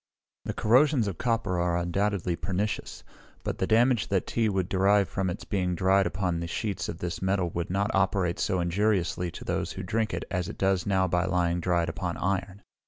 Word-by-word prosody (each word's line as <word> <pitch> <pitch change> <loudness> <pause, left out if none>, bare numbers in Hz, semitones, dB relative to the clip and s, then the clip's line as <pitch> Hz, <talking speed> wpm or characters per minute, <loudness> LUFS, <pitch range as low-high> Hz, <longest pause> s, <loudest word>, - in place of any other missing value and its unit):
The - - -2
corrosions 125 +1 +4
of 95 -5 -4
copper 115 -7 0
are 85 0 +1
undoubtedly 90 +1 0
pernicious; 100 +4 -3 0.4
but - - -3
the 95 - 0
damage 115 -4 +3
that 95 -2 0
tea 115 -2 0
would 95 -3 0
derive 100 +1 +3
from 95 +3 -2
its 90 +4 -5
being 90 -3 -1
dried 95 +1 +3
upon 90 -3 -2
sheets 100 +2 -3
of - - -5
this 85 0 -4
metal 95 -2 0
would 85 0 -3
not 100 +3 0
operate 95 -3 +1
so 95 - 0
injuriously 90 -1 0
to - - -9
those - - -2
who - - -6
drink 110 +4 -1
it - - -4
as 90 -2 -1
it - - -8
does 95 -2 +1
now 95 -2 +2
by 90 0 +1
lying 90 -2 +1
dried 85 -1 +1
upon 85 +1 -3
iron. 95 +1 -2
95 Hz, 195 wpm, -27 LUFS, 90-100 Hz, 0.4 s, corrosions